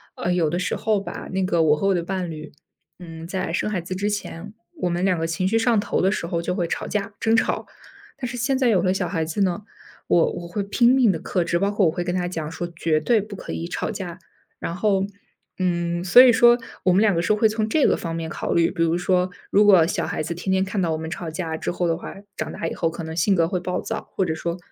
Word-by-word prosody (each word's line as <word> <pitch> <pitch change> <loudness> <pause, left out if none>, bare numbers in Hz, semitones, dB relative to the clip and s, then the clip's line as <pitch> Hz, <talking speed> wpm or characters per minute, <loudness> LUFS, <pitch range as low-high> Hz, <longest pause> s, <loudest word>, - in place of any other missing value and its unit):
呃， 175 +1 -1
有 165 -4 +2
的 175 - -1
时 185 - -1
候 215 -2 +1
吧， 200 - -7
那 190 0 0
个 170 -2 +2
我 150 -2 +4
和 195 - -2
我 195 - +4
的 175 - 0
伴 180 -1 -3
侣， 155 -1 -8 0.5
嗯， 165 -2 -9
在 185 -3 -3
生 200 - 0
孩 205 -4 -1
子 175 +2 -5
之 200 +3 -1
前， 205 -1 -5 0.3
我 180 - +1
们 175 +2 0
两 180 -3 +2
个 165 - -1
情 165 +3 -1
绪 225 +3 +2
上 230 -2 +3
头 - - -1
的 190 +1 +3
时 190 - -2
候， 170 0 -2
就 180 +2 -2
会 175 - 0
吵 - - -3
架、 205 -1 -3
争 225 0 +2
吵。 - - 0 0.5
但 255 -2 -4
是 245 - -6
现 265 +3 +1
在 260 -2 +2
有 190 -6 +3
了 185 - +2
小 185 -1 -1
孩 165 -4 -1
子 160 +6 -3
呢， 190 +1 +1 0.5
我 170 - +3
我 175 - -6
会 200 +4 -3
拼 235 +4 +3
命 245 -6 +5
地 165 - -3
克 180 +2 -1
制， 170 0 0
包 200 - +1
括 205 -1 +2
我 160 - +3
会 175 +2 -3
跟 175 +1 -2
他 180 -1 -1
讲 160 -3 -4
说： 175 +1 -4
“绝 160 -1 +1
对 220 +6 +2
不 210 0 -8
可 - - -7
以 170 - -4
吵 - - -3
架。” 180 -3 -6 0.4
然 - - -4
后 195 0 +1 0.5
嗯， 175 -1 -1
所 190 +8 +8
以 250 -2 +7
说， 240 +1 +6 0.3
我 185 - +4
们 185 +3 +4
两 210 -5 +3
个 170 - +1
说 210 +5 +2
会 220 - +4
从 215 0 -1
这 295 +6 +3
个 - - +3
方 165 -1 -5
面 165 -1 -4
考 - - -3
虑， 170 -1 +3
比 170 -2 0
如 165 +1 +2
说 180 0 +1 0.2
如 205 +1 +4
果 180 -5 +6
小 - - -1
孩 - - -3
子 165 +2 -3
天 180 +3 -3
天 190 0 +2
看 195 0 -2
到 170 - 0
我 160 - 0
们 160 0 -5
吵 170 0 -5
架 160 -1 -3
之 - - -3
后 175 0 -1
的 165 - +1
话， - - -8 0.2
长 - - -4
大 165 - -4
以 - - -3
后 165 - 0
可 165 - -7
能 160 0 -6
性 195 +4 +2
格 165 -2 +3
会 180 - -1
暴 180 0 -2
躁， 225 - -5
或 190 - +1
者 160 -2 -1
说 170 +2 -3
180 Hz, 300 characters per minute, -23 LUFS, 170-200 Hz, 0.5 s, 所